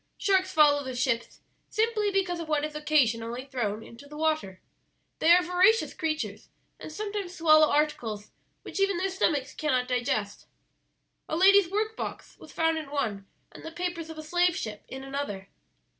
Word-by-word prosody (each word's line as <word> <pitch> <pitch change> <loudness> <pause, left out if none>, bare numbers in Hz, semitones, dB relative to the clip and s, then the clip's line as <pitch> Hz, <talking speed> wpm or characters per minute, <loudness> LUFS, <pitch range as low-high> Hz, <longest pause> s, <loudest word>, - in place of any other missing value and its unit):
Sharks 375 -1 +2
follow 290 -2 +4
the 260 -1 -5
ships 235 -2 -2 0.3
simply 435 -1 +1
because 375 -3 -1
of 330 -2 -6
what 300 -1 +1
is 305 - -6
occasionally 250 -5 0
thrown 225 -5 -3
into 235 +6 -13
the 300 +1 -10
water. 310 -12 -1 0.6
They 320 - +3
are 360 +1 +7
voracious 365 +5 +3
creatures, 315 -2 -4 0.3
and - - -8
sometimes 405 0 -5
swallow 310 -2 +5
articles 235 -9 -1 0.3
which - - -6
even 390 -2 +2
their 380 +2 -1
stomachs 290 -7 0
cannot 255 -5 0
digest. 235 -5 -2 0.8
A - - -1
lady's 390 0 +6
work 430 +3 -1
box - - -7
was - - -13
found 325 0 +1
in 305 -3 -8
one, 215 -9 -3 0.2
and - - -13
the 325 - -7
papers 340 -1 -4
of 320 - -9
a 310 - -7
slave 350 +2 +2
ship 215 - -6
in 265 0 -8
another." 270 -9 -5
310 Hz, 170 wpm, -27 LUFS, 255-360 Hz, 0.8 s, are